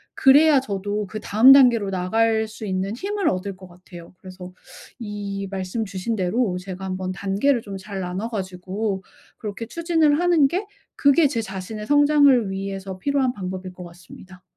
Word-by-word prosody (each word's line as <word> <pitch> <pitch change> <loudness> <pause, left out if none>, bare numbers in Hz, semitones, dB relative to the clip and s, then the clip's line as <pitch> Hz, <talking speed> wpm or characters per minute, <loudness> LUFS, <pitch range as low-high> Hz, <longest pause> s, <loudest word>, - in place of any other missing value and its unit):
그래야 285 +1 +6
저도 205 -2 -3
그다음 220 +5 +5
단계로 240 -7 +5
나갈 220 +4 +1
수 220 0 -9
있는 190 +3 -2
힘을 395 +4 -2
얻을 190 +1 -3
것 185 - -13
같아요. 175 -1 -14
그래서 185 -1 -11 0.5
이 200 -2 -5
말씀 195 +4 -3
주신 200 +3 -4
대로 195 +1 0
제가 190 0 -8
한번 185 0 -4
단계를 200 +7 0
좀 200 -2 -8
잘 195 0 -7
나눠 185 +5 -4
가지고 190 0 -4 0.4
그렇게 210 +1 -6
추진을 325 0 +1
하는 345 -5 +4
게 375 +7 -3 0.3
그게 285 +2 +4
제 235 -5 -2
자신의 210 +1 -7
성장을 285 -7 +4
위해서 195 -1 -5
필요한 270 0 0
방법일 185 -1 -6
것 180 - -10
같습니다. 180 +2 -15
205 Hz, 330 characters per minute, -22 LUFS, 185-250 Hz, 0.5 s, 그래야